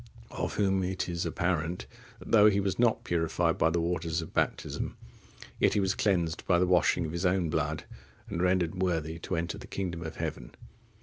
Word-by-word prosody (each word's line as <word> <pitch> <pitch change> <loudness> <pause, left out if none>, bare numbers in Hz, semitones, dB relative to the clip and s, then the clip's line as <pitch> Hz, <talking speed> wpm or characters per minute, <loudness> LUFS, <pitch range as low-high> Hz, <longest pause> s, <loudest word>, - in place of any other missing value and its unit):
Of - - -3
whom 95 -2 +2
it 90 0 -2
is 85 -1 -2
apparent, 85 0 -1 0.3
that - - -11
though 105 -1 +8
he 100 -1 +1
was 100 +1 -1
not 120 -2 +3
purified 85 0 0
by 80 - +4
the 85 +1 0
waters 85 -1 -1
of 80 - -6
baptism, - - -1 0.6
yet - - +3
he - - +3
was 95 -1 +2
cleansed 85 -6 0
by 90 - +4
the 90 - +3
washing 90 -1 +3
of 80 - -4
his 85 +2 -3
own 90 -3 +2
blood, 75 0 -1 0.4
and 95 -6 -3
rendered 90 -1 +1
worthy 80 -3 -1
to 95 - -3
enter 85 +1 -3
the - - -10
kingdom 90 -4 -4
of 80 -1 -6
heaven. 75 -7 -5
85 Hz, 195 wpm, -29 LUFS, 80-95 Hz, 0.6 s, though